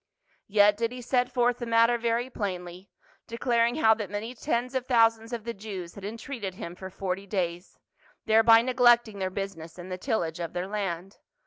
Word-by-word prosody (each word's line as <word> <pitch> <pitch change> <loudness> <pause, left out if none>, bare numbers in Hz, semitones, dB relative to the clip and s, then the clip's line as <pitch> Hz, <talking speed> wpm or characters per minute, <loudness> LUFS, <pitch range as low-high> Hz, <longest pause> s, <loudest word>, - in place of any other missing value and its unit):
Yet 205 0 +4
did 230 +1 -1
he 250 - -7
set 250 +1 0
forth 245 -1 +1
the 240 - -4
matter 230 +1 +4
very 235 +1 0
plainly, 185 -5 -5 0.4
declaring 235 0 +1
how 220 -8 +5
that 215 -4 -5
many 210 +4 -5
tens 250 -1 -2
of 260 -1 -2
thousands 225 -2 +3
of 235 -3 -4
the 235 +1 -4
Jews 195 -5 -7
had 200 - -11
en 210 +3 -5
treated 220 -6 -6
him 170 -1 -7
for 190 +1 -8
forty 190 +1 -4
days, 175 -2 -3 0.5
thereby 225 +1 +6
neglecting 240 -4 +3
their 190 -1 -1
business 185 -4 -6
and 180 +1 -9
the 185 - -4
tillage 175 - -2
of 170 -2 -4
their 180 +1 -2
land. 195 -2 -4
220 Hz, 190 wpm, -27 LUFS, 190-235 Hz, 0.5 s, thereby